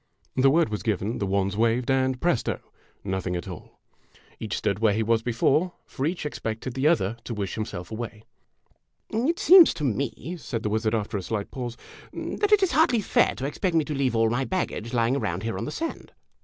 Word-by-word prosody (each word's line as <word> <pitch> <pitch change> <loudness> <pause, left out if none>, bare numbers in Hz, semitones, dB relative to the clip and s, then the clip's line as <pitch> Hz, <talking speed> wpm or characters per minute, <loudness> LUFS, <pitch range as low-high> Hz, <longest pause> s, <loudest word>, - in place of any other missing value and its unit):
The 130 +1 +5
word 165 -1 +3
was 105 -1 -3
given, 105 0 -1
the 100 - -1
wands 100 0 0
waved, 115 +3 +1
and, 130 -1 +1
presto! 170 -6 0 0.4
nothing 95 -2 -2
at 85 - -4
all! 90 -4 -10 0.6
Each - - -3
stood 100 0 -1
where 110 -2 +3
he 110 - +1
was 115 +1 +2
before, 135 +9 +1
for 135 - -3
each 170 -1 -3
expected 115 -3 -4
the 135 +3 +1
other 115 - +2
to 115 - -5
wish 100 -2 -3
himself 100 -5 -5
away. 110 -1 -6 0.5
" - - -43
It 260 +10 +1
seems 360 -1 +8
to 150 - -5
me," 135 - -2
said 115 -7 -4
the 105 - 0
wizard, 110 +1 +1
after 105 -1 -2
a - - -5
slight 100 +3 -4
pause, 120 -2 -5 0.4
"that 415 0 -2
it 415 -2 +6
is 380 - +2
hardly 255 -8 +3
fair - - +2
to 135 - -4
expect 170 +5 -1
me 160 -2 +3
to 150 - -3
leave 135 -4 0
all 115 0 +3
my 120 +3 0
baggage 130 - -3
lying 120 +1 +2
around 90 -9 -2
here 115 0 -2
on - - -3
the 150 - -4
sand 330 - -5
120 Hz, 210 wpm, -26 LUFS, 110-150 Hz, 0.6 s, seems